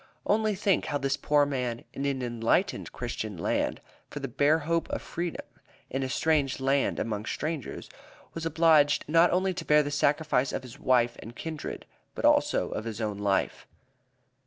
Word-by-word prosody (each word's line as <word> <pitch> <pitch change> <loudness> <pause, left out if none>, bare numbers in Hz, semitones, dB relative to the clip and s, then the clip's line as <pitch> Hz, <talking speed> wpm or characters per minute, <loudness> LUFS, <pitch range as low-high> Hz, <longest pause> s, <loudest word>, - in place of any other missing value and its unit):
Only 215 0 +2
think 195 -3 +1
how 145 - -1
this 135 -1 0
poor 145 0 +3
man, 125 -4 -3
in 140 +1 -2
an 135 -2 -1
enlightened 120 - 0
Christian 110 -5 -5
land, 80 - -1 0.3
for 145 - -6
the 135 - -4
bare 145 +5 +3
hope 165 +2 -1
of - - -2
freedom, 170 0 -5 0.5
in 135 - -1
a 130 - -2
strange 145 -2 +1
land 135 +1 +1
amongst 105 -1 -3
strangers, 155 -3 -4 0.5
was 165 - -5
obliged 160 -3 +4
not 165 +3 +5
only 185 +1 +1
to 175 -1 -5
bear 150 -1 +4
the 145 - -4
sacrifice 145 -2 +1
of - - -3
his 125 -2 -11
wife 120 -2 +2
and 115 +2 -10
kindred, 160 -2 -6 0.3
but - - -2
also - - +3
of 110 - -4
his 115 -1 -5
own 105 -2 -2
life. 100 -1 0
145 Hz, 175 wpm, -28 LUFS, 125-160 Hz, 0.5 s, not